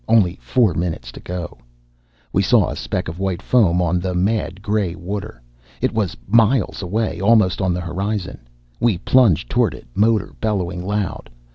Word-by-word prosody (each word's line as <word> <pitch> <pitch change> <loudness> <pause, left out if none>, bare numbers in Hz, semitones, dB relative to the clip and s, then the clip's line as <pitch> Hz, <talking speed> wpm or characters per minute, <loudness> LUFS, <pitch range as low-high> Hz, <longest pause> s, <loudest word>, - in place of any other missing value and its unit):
Only 100 -6 +3
four 115 -7 +2
minutes 80 -8 -3
to - - -11
go. 90 -1 -6 0.7
We - - +3
saw - - +3
a - - -4
speck - - -3
of 80 +3 -6
white 95 -3 -1
foam 95 -6 +3
on 90 +1 +1
the 90 0 -3
mad 100 0 -1
gray 100 -4 0
water. 95 - -6 0.4
It - - 0
was 105 - -1
miles 115 +2 +2
away, 95 -1 -2
almost 105 -3 +3
on 95 -1 +1
the 90 0 -2
horizon. 95 +3 -3 0.4
We 115 -6 +2
plunged 100 - +3
toward - - +2
it, - - -13
motor 110 - +2
bellowing 90 -5 -1
loud. 100 0 -3
95 Hz, 165 wpm, -20 LUFS, 90-110 Hz, 0.7 s, Only